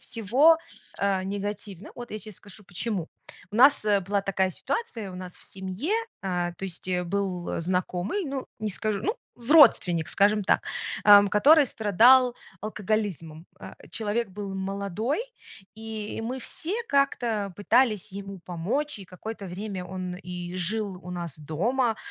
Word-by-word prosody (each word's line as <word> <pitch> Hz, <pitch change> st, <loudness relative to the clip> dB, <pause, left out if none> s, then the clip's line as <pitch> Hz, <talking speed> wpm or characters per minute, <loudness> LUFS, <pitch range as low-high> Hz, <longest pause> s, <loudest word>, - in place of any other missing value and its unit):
всего, 260 Hz, +9 st, +4 dB, 0.4 s
э, 195 Hz, -1 st, +1 dB
негативно. 200 Hz, 0 st, -5 dB
Вот 240 Hz, 0 st, -8 dB
я 215 Hz, -, -4 dB
те 215 Hz, 0 st, -10 dB
скажу 205 Hz, +1 st, -13 dB
почему. 185 Hz, -1 st, -3 dB, 0.4 s
У -, -, -3 dB
нас 270 Hz, -2 st, +6 dB, 0.2 s
была 200 Hz, 0 st, +1 dB
такая 190 Hz, -1 st, 0 dB
ситуация, 235 Hz, -, -3 dB
у -, -, -9 dB
нас 180 Hz, -1 st, -8 dB
в -, -, -14 dB
семье, 190 Hz, -, -4 dB, 0.3 s
э, 180 Hz, -2 st, -1 dB
то -, -, -6 dB
есть 185 Hz, 0 st, -6 dB, 0.2 s
был 185 Hz, -2 st, -2 dB
знакомый, 180 Hz, -, -1 dB
ну, 270 Hz, -2 st, -4 dB
не 215 Hz, -, -2 dB
скажу, 210 Hz, +1 st, -1 dB
ну, 425 Hz, -, 0 dB, 0.2 s
родственник, 235 Hz, -, +5 dB
скажем 205 Hz, 0 st, +3 dB
так, -, -, +3 dB, 0.4 s
ам, 205 Hz, -1 st, +9 dB
который 290 Hz, +10 st, +6 dB
страдал 240 Hz, +3 st, +5 dB, 0.2 s
алкоголизмом. 200 Hz, -6 st, -3 dB
А, -, -, -10 dB
человек 220 Hz, +1 st, -1 dB
был 195 Hz, 0 st, -6 dB
молодой, 200 Hz, -, -2 dB, 0.5 s
и 220 Hz, -1 st, -6 dB
мы 250 Hz, +4 st, -3 dB
все 330 Hz, -, -5 dB
как-то 240 Hz, -, +1 dB
пытались 210 Hz, -2 st, +2 dB
ему 195 Hz, -1 st, -7 dB
помочь. 205 Hz, -, -2 dB
И 195 Hz, -, -10 dB
какое-то 200 Hz, +3 st, -7 dB
время 185 Hz, 0 st, -5 dB
он 180 Hz, 0 st, -5 dB
и 180 Hz, -1 st, -7 dB
жил 195 Hz, +1 st, -1 dB
у 180 Hz, -, -8 dB
нас 170 Hz, -4 st, -5 dB
дома. 220 Hz, -, 0 dB
205 Hz, 145 wpm, -26 LUFS, 185-230 Hz, 0.5 s, ам